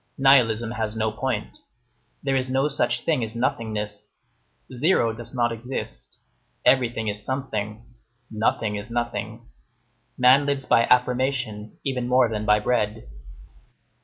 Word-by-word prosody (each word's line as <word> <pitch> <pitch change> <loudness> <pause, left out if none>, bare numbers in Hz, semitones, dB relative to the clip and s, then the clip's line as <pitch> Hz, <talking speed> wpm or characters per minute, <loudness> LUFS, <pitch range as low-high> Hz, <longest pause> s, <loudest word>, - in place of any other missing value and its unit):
Nihilism 120 -5 +4
has 110 -2 -3
no 110 0 0
point. 110 -2 -3 0.7
There 135 -1 0
is 130 -1 0
no 135 +2 +2
such 145 -1 0
thing 150 -7 +1
as 110 0 -5
nothingness. 110 -4 -3 0.6
Zero 125 -5 +2
does 115 +1 -6
not 120 -2 +1
exist. 125 +3 -5 0.5
Everything 120 -4 +2
is 105 0 -2
something. 110 -5 -4 0.5
Nothing 110 -1 0
is 105 +3 -7
nothing. 120 0 -4 0.7
Man 130 +3 +5
lives 140 -2 -1
by 115 - +4
affirmation 125 -4 0
even 125 -3 -1
more 125 -1 +4
than 105 -1 -3
by 105 0 +5
bread. 105 - -1
120 Hz, 130 wpm, -24 LUFS, 110-130 Hz, 0.7 s, Man